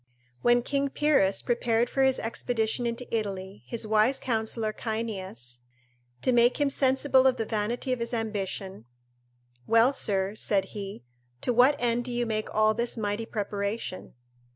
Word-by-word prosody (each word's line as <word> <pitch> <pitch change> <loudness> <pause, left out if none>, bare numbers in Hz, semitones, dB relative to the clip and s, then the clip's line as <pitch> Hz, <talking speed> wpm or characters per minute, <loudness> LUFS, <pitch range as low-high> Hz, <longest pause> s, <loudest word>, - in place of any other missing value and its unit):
When 240 0 +4
King 280 +1 0
Pyrrhus 270 -10 +2
prepared 235 -1 +1
for 270 - -1
his 265 -1 +3
expedition 230 +1 -1
into 235 +2 -4
Italy, 195 -3 -4
his 230 -2 -3
wise 215 +5 +3
counsellor 220 -2 -1
Cyneas, 190 - -5 0.6
to 255 - +3
make 240 +2 +4
him 285 -1 +2
sensible 265 0 +3
of 255 -1 +2
the 225 - -2
vanity 230 +4 -1
of 250 - -3
his 235 0 -3
ambition: 200 - -4 0.8
"Well, 230 +4 +5
sir," 195 -5 0
said 200 -3 +1
he, 195 - -7 0.4
"to 245 - 0
what 255 +5 +5
end 240 -1 0
do 250 - -3
you 240 0 0
make 215 -1 -3
all 215 0 +3
this 235 +2 -1
mighty 210 +1 -2
preparation?" 205 - -4
230 Hz, 155 wpm, -27 LUFS, 210-245 Hz, 0.8 s, Well